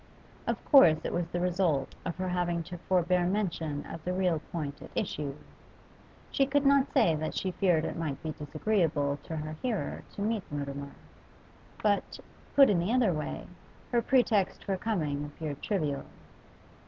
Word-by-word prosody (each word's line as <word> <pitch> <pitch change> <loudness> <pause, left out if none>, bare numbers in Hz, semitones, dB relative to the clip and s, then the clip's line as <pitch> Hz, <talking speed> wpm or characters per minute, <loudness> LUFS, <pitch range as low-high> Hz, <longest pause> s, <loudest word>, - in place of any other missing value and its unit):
Of - - -2
course 175 - +7
it - - -3
was 175 -1 0
the 175 +1 -3
result 175 -6 +1
of 170 - -2
her 185 0 -2
having 175 -1 0
to 175 +2 -8
forbear 180 -1 +3
mention 170 -7 -1
of 165 - -8
the 180 - -1
real 180 -4 +1
point 150 -3 -4
at - - -9
issue; 140 -2 -2 1.0
she 275 - +2
could 285 +1 +2
not 280 0 +4
say 165 - +4
that 155 0 -3
she 190 - -1
feared 175 -3 +2
it - - -3
might 155 -5 -3
be 160 - -2
disagreeable 155 -2 0
to 160 - -6
her 155 0 -4
hearer 235 -6 -2
to - - -5
meet 220 0 0
Mutimer. 140 -1 -4 0.9
But, 205 -2 +1 0.4
put 275 -1 +9
in 185 - +3
the 175 +6 0
other 240 -7 +3
way, 150 -1 -4 0.5
her 240 -1 +3
pretext 230 -7 +2
for 195 - 0
coming 160 -9 -1
appeared 145 -1 -6
trivial. 150 -9 -1
175 Hz, 165 wpm, -30 LUFS, 150-200 Hz, 1.0 s, put